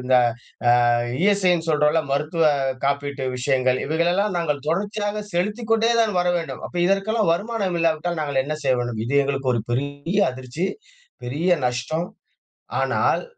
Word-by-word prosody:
இந்த 130 Hz, -, +2 dB, 0.8 s
அ -, -, +4 dB, 0.3 s
இஎஸ்ஐ 200 Hz, -2 st, +3 dB
ன்னு 165 Hz, -1 st, -2 dB
சொல்றோல்ல 150 Hz, +1 st, +3 dB
மருத்துவ 150 Hz, +4 st, 0 dB, 0.4 s
காப்பீட்டு 140 Hz, 0 st, -1 dB
விஷயங்கள், 130 Hz, 0 st, +1 dB
இவைகளெல்லாம் 175 Hz, +6 st, +1 dB
நாங்க 165 Hz, -3 st, +1 dB
தொடர்ச்சியாக 205 Hz, +4 st, -1 dB
செலுத்திக்கொண்டே 220 Hz, +5 st, +1 dB
தான் 220 Hz, -2 st, +1 dB
வர 180 Hz, -, +1 dB
வேண்டும். 140 Hz, -6 st, -5 dB
அப்ப -, -, -10 dB
இதற்கெல்லாம் 195 Hz, +1 st, +1 dB
வருமானம் 200 Hz, 0 st, -1 dB
இல்லாவிட்டால் 165 Hz, +1 st, 0 dB
நாங்க 140 Hz, -3 st, 0 dB
என்ன 155 Hz, +1 st, -2 dB
செய்ய 130 Hz, -2 st, +3 dB
வேண்டும்? 120 Hz, -2 st, -3 dB
இது 140 Hz, -, -1 dB
எங்களுக்கு 135 Hz, -2 st, -1 dB
ஒரு 115 Hz, -, 0 dB
பெரிய 140 Hz, +8 st, -2 dB
அதிர்ச்சி, 130 Hz, +7 st, -4 dB, 0.6 s
பெரிய 150 Hz, +9 st, -1 dB, 0.2 s
நஷ்டம். 140 Hz, +8 st, -2 dB, 0.7 s
ஆனால். -, -, +1 dB
160 Hz, 140 wpm, -22 LUFS, 140-195 Hz, 0.8 s, அ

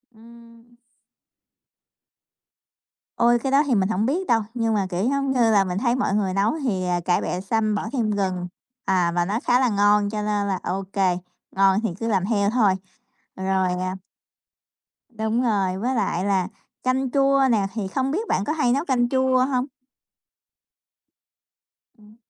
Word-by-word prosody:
Ừm. 235 Hz, +1 st, -18 dB, 2.4 s
Ôi, 240 Hz, 0 st, +4 dB
cái 265 Hz, +3 st, -3 dB
đó 280 Hz, +2 st, +4 dB
thì 255 Hz, -, +2 dB
mình 195 Hz, -1 st, +1 dB
hổng 215 Hz, +1 st, 0 dB
biết 350 Hz, +9 st, -1 dB
đâu. 230 Hz, -2 st, +3 dB
Nhưng 230 Hz, -2 st, 0 dB
mà, 200 Hz, -3 st, 0 dB
kiểu 190 Hz, +7 st, -1 dB
giống 275 Hz, -1 st, 0 dB
như 240 Hz, -3 st, +3 dB
là, 200 Hz, -2 st, +4 dB
mình 180 Hz, -1 st, -3 dB
thấy 240 Hz, +2 st, +1 dB
mọi 255 Hz, -6 st, 0 dB
người 195 Hz, -3 st, 0 dB
nấu 200 Hz, +5 st, +1 dB
thì, 190 Hz, -8 st, -1 dB
à, 175 Hz, -1 st, 0 dB
cải 175 Hz, +1 st, 0 dB
bẹ 180 Hz, -, -3 dB
xanh 215 Hz, +2 st, 0 dB
bỏ 205 Hz, +1 st, -3 dB
thêm 225 Hz, -5 st, 0 dB
gừng, 185 Hz, -3 st, -2 dB, 0.4 s
à, 180 Hz, -3 st, +2 dB
và 175 Hz, -, +1 dB
nó 205 Hz, +5 st, -1 dB
khá 245 Hz, +1 st, +3 dB
là 255 Hz, -, +2 dB
ngon. 205 Hz, 0 st, +3 dB
Cho 210 Hz, 0 st, -3 dB
nên 210 Hz, -1 st, -1 dB
là 190 Hz, -2 st, -1 dB
ô 195 Hz, +2 st, -2 dB
kê, 185 Hz, -3 st, +1 dB, 0.4 s
ngon 195 Hz, 0 st, +4 dB
thì -, -, 0 dB
cứ 230 Hz, -, -3 dB
làm 195 Hz, -5 st, +1 dB
theo 200 Hz, -2 st, +1 dB
thôi. 215 Hz, -5 st, +3 dB, 0.6 s
Rồi, 190 Hz, -1 st, 0 dB
à 185 Hz, 0 st, -3 dB, 1.1 s
Đúng 220 Hz, +1 st, -1 dB
rồi. 195 Hz, -6 st, 0 dB
Với 250 Hz, +6 st, -1 dB
lại 195 Hz, -4 st, -1 dB
là 190 Hz, -3 st, +1 dB, 0.4 s
canh 255 Hz, 0 st, 0 dB
chua 275 Hz, 0 st, +3 dB
nè, 205 Hz, -4 st, +2 dB
thì 210 Hz, -4 st, -3 dB
không 265 Hz, +6 st, -2 dB
biết 430 Hz, +8 st, -2 dB
bạn 195 Hz, -, +1 dB
có 305 Hz, -, -1 dB
hay 300 Hz, -6 st, +1 dB
nấu 280 Hz, +5 st, -1 dB
canh 245 Hz, -4 st, +1 dB
chua 260 Hz, -1 st, +2 dB
hông? 255 Hz, -1 st, -1 dB, 2.3 s
Ừm. 215 Hz, 0 st, -19 dB
215 Hz, 180 wpm, -23 LUFS, 195-245 Hz, 2.4 s, Ôi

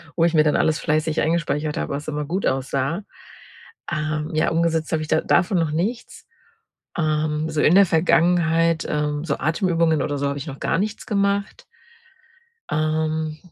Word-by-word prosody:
wo 165 Hz, -, +2 dB
ich 170 Hz, -, +1 dB
mir 155 Hz, -2 st, +5 dB
dann 150 Hz, -, +2 dB
alles 155 Hz, 0 st, +2 dB
fleißig 155 Hz, 0 st, 0 dB
eingespeichert 155 Hz, -2 st, -1 dB
habe, -, -, -3 dB
was 145 Hz, +2 st, -5 dB
immer 150 Hz, -1 st, -3 dB
gut 180 Hz, +6 st, -2 dB
aussah. 135 Hz, +7 st, -1 dB, 0.9 s
Ähm, 155 Hz, 0 st, -2 dB
ja, 155 Hz, -, +2 dB
umgesetzt 165 Hz, -1 st, 0 dB
habe 155 Hz, -, +1 dB
ich 155 Hz, -, -5 dB
da 160 Hz, -, +3 dB
davon 180 Hz, 0 st, +2 dB
noch 160 Hz, -2 st, 0 dB
nichts. 200 Hz, +10 st, -3 dB, 0.7 s
Ähm, 155 Hz, 0 st, 0 dB
so 155 Hz, -1 st, -1 dB
in 170 Hz, -, +5 dB
der 200 Hz, -, +7 dB
Vergangenheit 165 Hz, 0 st, +2 dB
ähm, 150 Hz, 0 st, -1 dB
so 140 Hz, -4 st, -2 dB
Atemübungen 165 Hz, -1 st, +1 dB
oder 145 Hz, -1 st, -2 dB
so 140 Hz, -, -1 dB
habe 140 Hz, -, -3 dB
ich 140 Hz, -, -7 dB
noch 135 Hz, -, -7 dB
gar -, -, 0 dB
nichts 215 Hz, +4 st, -3 dB
gemacht. 200 Hz, -2 st, -1 dB, 1.1 s
Ähm, 155 Hz, 0 st, -1 dB
155 Hz, 170 wpm, -22 LUFS, 150-170 Hz, 1.1 s, der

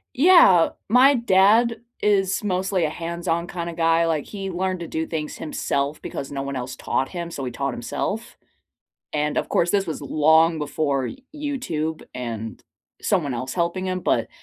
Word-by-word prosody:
Yeah, 275 Hz, -, +7 dB, 0.2 s
my 255 Hz, +5 st, +6 dB
dad 230 Hz, 0 st, +4 dB, 0.2 s
is 195 Hz, -1 st, +2 dB
mostly 190 Hz, -1 st, 0 dB
a -, -, 0 dB
hands-on 170 Hz, +1 st, -2 dB
kinda 170 Hz, -1 st, -5 dB
guy, 165 Hz, 0 st, +3 dB
like 160 Hz, -3 st, 0 dB
he 195 Hz, -2 st, -6 dB
learned 185 Hz, 0 st, -2 dB
to 170 Hz, -, -6 dB
do 160 Hz, 0 st, -2 dB
things 155 Hz, -2 st, -4 dB
himself 145 Hz, -1 st, -2 dB
because 135 Hz, -, -6 dB
no 140 Hz, -, -3 dB
one 140 Hz, 0 st, -4 dB
else 125 Hz, 0 st, -5 dB
taught 135 Hz, -, -1 dB
him, 170 Hz, -1 st, -5 dB
so 135 Hz, -, -5 dB
he 125 Hz, -, -4 dB
taught 140 Hz, 0 st, -2 dB
himself. 200 Hz, -, -4 dB, 0.8 s
And 150 Hz, 0 st, -1 dB
of -, -, -2 dB
course 170 Hz, -, +2 dB
this 200 Hz, 0 st, +1 dB
was 160 Hz, -, -4 dB
long 160 Hz, +3 st, +4 dB
before 145 Hz, -3 st, -1 dB
Y -, -, -6 dB, 0.2 s
YouTube 250 Hz, -, -3 dB
and 115 Hz, -3 st, -5 dB, 0.4 s
someone 155 Hz, -9 st, 0 dB
else 130 Hz, +2 st, -4 dB
helping 175 Hz, +2 st, -1 dB
him, 185 Hz, 0 st, -2 dB
but -, -, +1 dB
170 Hz, 170 wpm, -23 LUFS, 150-190 Hz, 0.8 s, Yeah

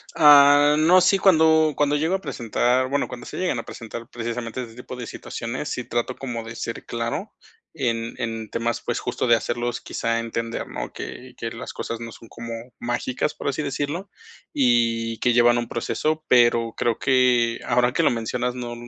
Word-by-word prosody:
Ah, 145 Hz, 0 st, +7 dB
no, 180 Hz, +4 st, +6 dB
sí, 195 Hz, +2 st, +4 dB
cuando 160 Hz, -4 st, +5 dB
cuando 145 Hz, 0 st, +2 dB
llego 160 Hz, +6 st, +1 dB
a -, -, -2 dB
presentar, 125 Hz, -, 0 dB
bueno, 140 Hz, 0 st, 0 dB
cuando 125 Hz, -1 st, -9 dB
se -, -, -7 dB
llegan 180 Hz, -10 st, 0 dB
a -, -, -5 dB
presentar 115 Hz, 0 st, -8 dB
precisamente 120 Hz, +1 st, -4 dB
ese 115 Hz, -2 st, -11 dB
tipo 125 Hz, +1 st, -9 dB
situaciones, 120 Hz, +6 st, -5 dB
sí 125 Hz, -, -3 dB
trato 120 Hz, +2 st, -2 dB
como 120 Hz, -4 st, -5 dB
de 115 Hz, +1 st, -8 dB
ser 115 Hz, -, -5 dB
claro 120 Hz, -, -3 dB, 0.4 s
en 115 Hz, -5 st, -2 dB
en 115 Hz, -2 st, -4 dB
temas, 115 Hz, 0 st, -2 dB
pues, -, -, -2 dB
justo -, -, -2 dB
de 120 Hz, -, +6 dB
hacerlos 120 Hz, +1 st, -2 dB
quizá 115 Hz, 0 st, -2 dB
entender, 115 Hz, 0 st, -4 dB
¿no? -, -, -6 dB
Que 125 Hz, 0 st, -8 dB
que 115 Hz, 0 st, -4 dB
las 115 Hz, -, -7 dB
cosas 115 Hz, 0 st, -5 dB
no 115 Hz, -1 st, -7 dB
son 115 Hz, -, -14 dB
como 115 Hz, +1 st, -8 dB, 0.3 s
mágicas, 120 Hz, +4 st, -2 dB
por -, -, -3 dB
así 140 Hz, +3 st, -2 dB
decirlo, 145 Hz, +6 st, -3 dB, 0.4 s
y 115 Hz, -3 st, +1 dB
que 125 Hz, -, +2 dB
llevan 120 Hz, 0 st, +5 dB
un 120 Hz, -, -3 dB
proceso, 155 Hz, +6 st, -2 dB
pero 120 Hz, -2 st, +4 dB
creo 115 Hz, -2 st, 0 dB
que 125 Hz, -3 st, +3 dB
ahora 125 Hz, +1 st, +2 dB
que -, -, +2 dB
lo -, -, +4 dB
mencionas 125 Hz, +2 st, -2 dB
no 120 Hz, -1 st, -5 dB
120 Hz, 185 wpm, -23 LUFS, 115-140 Hz, 0.4 s, Ah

